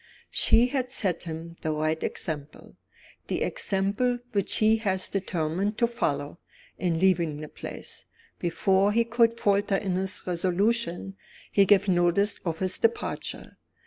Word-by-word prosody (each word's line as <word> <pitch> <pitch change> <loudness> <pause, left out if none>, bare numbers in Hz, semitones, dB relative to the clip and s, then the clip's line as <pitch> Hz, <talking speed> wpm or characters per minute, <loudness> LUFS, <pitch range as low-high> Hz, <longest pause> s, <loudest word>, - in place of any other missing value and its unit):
She 235 - +4
had 255 -2 -1
set 200 -9 0
him 165 +1 -7
the 160 - -2
right 155 +1 -1
example, 150 -2 -4 0.5
the - - -1
example 200 +6 +1
which 200 -4 +1
he 220 0 +3
was 190 -3 0
determined 190 +2 -2
to 235 - +3
follow, 160 -10 -2 0.4
in 175 -3 0
leaving 170 -4 +2
the 155 - -6
place. - - -8 0.3
Before 190 +3 +2
he 235 +1 +3
could 230 0 +2
falter 200 0 +2
in 195 -1 -1
his 190 0 -1
resolution, 190 +2 0 0.3
he 200 - +5
gave 205 0 +4
notice 180 +3 +2
of 165 -3 -2
his 185 +1 0
departure. 230 0 -2
190 Hz, 140 wpm, -27 LUFS, 170-210 Hz, 0.5 s, he